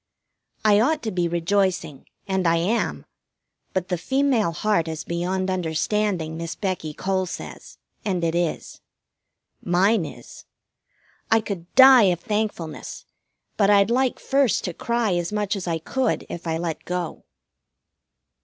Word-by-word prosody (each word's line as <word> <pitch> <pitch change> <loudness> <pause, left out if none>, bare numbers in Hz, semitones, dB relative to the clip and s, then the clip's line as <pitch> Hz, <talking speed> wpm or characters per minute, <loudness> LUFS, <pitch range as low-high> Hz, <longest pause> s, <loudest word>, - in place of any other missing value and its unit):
I 205 -1 +6
ought 300 +7 +1
to 220 - -2
be 175 -1 0
rejoicing, 175 -3 -1 0.2
and 190 -2 0
I 165 - +4
am; 185 +8 -1 0.7
but 185 -1 -2
the 180 -2 -1
female 265 -6 +1
heart 170 0 0
is 160 -1 -4
beyond 185 +2 -2
understanding, 175 0 -1
Miss 165 0 -5
Becky 185 -6 -3
Cole 185 +4 -1
says, - - -9 0.3
and 185 -4 -1
it 165 -1 +1
is. 170 -2 -2 0.8
Mine 190 +3 +2
is. - - -11 0.8
I 225 - +5
could 195 -5 -6
die 260 -3 +9
of 180 -3 +2
thankfulness, 205 -7 -4 0.5
but 200 -2 +3
I'd 200 +1 +5
like 255 +1 +1
first 270 -4 +1
to 180 - -3
cry 235 0 0
as 175 +1 -1
much 210 0 -1
as 190 -3 -5
I 165 -1 0
could 250 +9 -1
if 170 0 -6
I 160 0 0
let 165 -1 -4
go. 180 -2 -4
185 Hz, 145 wpm, -23 LUFS, 170-215 Hz, 0.8 s, die